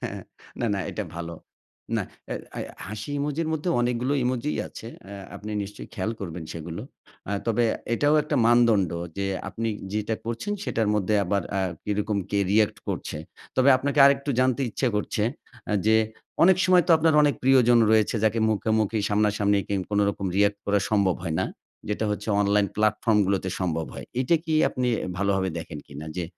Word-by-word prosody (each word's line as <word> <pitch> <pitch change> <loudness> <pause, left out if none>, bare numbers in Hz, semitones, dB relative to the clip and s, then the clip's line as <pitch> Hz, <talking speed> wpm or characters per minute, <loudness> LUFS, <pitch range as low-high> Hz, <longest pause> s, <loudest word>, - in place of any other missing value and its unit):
হ্যাঁ, - - -4 0.4
না, 120 - +1
না - - -2
এটা - - -4
ভালো। 85 0 -5 0.6
না - - 0 0.3
আ - - -2 0.2
আ - - -2 0.3
হাসি 110 +6 -6
ইমোজির 150 +3 -1
মধ্যে 160 +3 -2
অনেকগুলো 120 +3 0
ইমোজই 130 +4 -1
আছে 115 - -10 0.2
আ - - -8 0.2
আপনি 105 - -7
নিশ্চয়ই 100 +1 -8
খেয়াল 95 +3 -2
করবেন 85 -3 -5
সেগুলো। 85 +1 -6 0.5
আ - - -1
তবে 115 +1 +2 0.3
এটাও 145 +4 +3
একটা 150 -1 -2
মানদণ্ড 115 -7 +4 0.3
যে 100 - 0 0.2
আপনি 115 +4 -3 0.2
যেটা 105 +1 -1
করছেন 115 - -3
সেটার 110 - 0
মধ্যে 105 0 +1
আবার 100 +1 0 0.2
আ - - +1 0.2
কিরকম 105 0 -1
কে 100 - +1
রিঅ্যাক্ট 105 0 +3
করছে। - - -3 0.4
তবে 130 +1 +4
আপনাকে 140 +2 -2
আরেকটু 140 +1 +2
জানতে 130 +1 +2
ইচ্ছা 130 - 0
করছে 105 0 -1 0.5
আ - - +1
যে 110 0 +5 0.5
অনেক 185 +1 +7
সময় 185 -1 +5
তো - - 0
আপনার 160 0 +3
অনেক 145 -1 +3
প্রিয়জন 125 -2 +5
রয়েছে 110 +1 +3
যাকে 110 +1 +2
মুখামুখি 110 0 +1
সামনাসামনি 105 -1 +2
কি 100 - -1 0.2
কোনোরকম 100 -1 +1
রিঅ্যাক্ট 100 0 +3
করা 105 0 +3
সম্ভব 100 -4 +2
হয় 80 - -2
না - - +1 0.4
যেটা 105 +1 -1
হচ্ছে 105 +1 -4
অনলাইন 100 0 +3
প্লাটফর্ম 110 0 +2
গুলোতে 95 -1 0
সম্ভব 80 -3 -1
হয়। - - -8
এটা 150 +6 +3
কি 160 -1 -1
আপনি 125 -1 -1 0.3
ভালোভাবে 95 -1 +1
দেখেন 80 -2 -7
কিনা? 75 +2 -9
যে 90 - -1
105 Hz, 175 wpm, -25 LUFS, 100-125 Hz, 0.6 s, অনেক